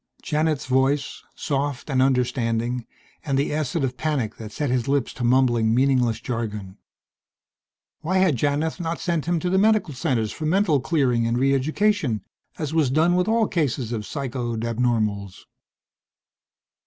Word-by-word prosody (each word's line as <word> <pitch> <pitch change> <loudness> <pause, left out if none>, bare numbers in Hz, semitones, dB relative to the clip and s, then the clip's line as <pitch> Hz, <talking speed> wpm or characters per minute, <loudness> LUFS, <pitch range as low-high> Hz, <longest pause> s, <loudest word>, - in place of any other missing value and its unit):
Janith's 155 -1 0
voice, 135 +2 +1
soft 140 -2 -2
and 135 -3 +1
understanding, 125 -2 0 0.4
and 140 -3 0
the 140 +1 0
acid 155 0 -1
of 130 -1 -2
panic 130 -7 -2
that 110 -1 -8
set 145 +3 -2
his 125 0 0
lips 140 -2 0
to 125 - -6
mumbling 120 -3 +3
meaningless 125 -4 +2
jargon.... 105 -5 -5 1.2
Why 185 +4 -1
had 185 -6 +3
Janith 145 +6 -1
not 170 -1 -3
sent 170 -4 -1
him 175 -1 +1
to 180 - -1
the 190 - +3
medical 210 -6 +2
centers 125 -6 -1
for 155 - -4
mental 175 -3 +3
clearing 125 -5 +1
and 115 +1 0
re 135 +2 +3
education 145 - +1 0.3
as 155 -1 -3
was 155 -5 +2
done 160 +6 +3
with 180 +2 +1
all 225 -1 +2
cases 135 -7 -1
of 115 -3 -2
psychoed 120 -2 -4
abnormals? 110 -5 -1
135 Hz, 155 wpm, -23 LUFS, 120-155 Hz, 1.2 s, mumbling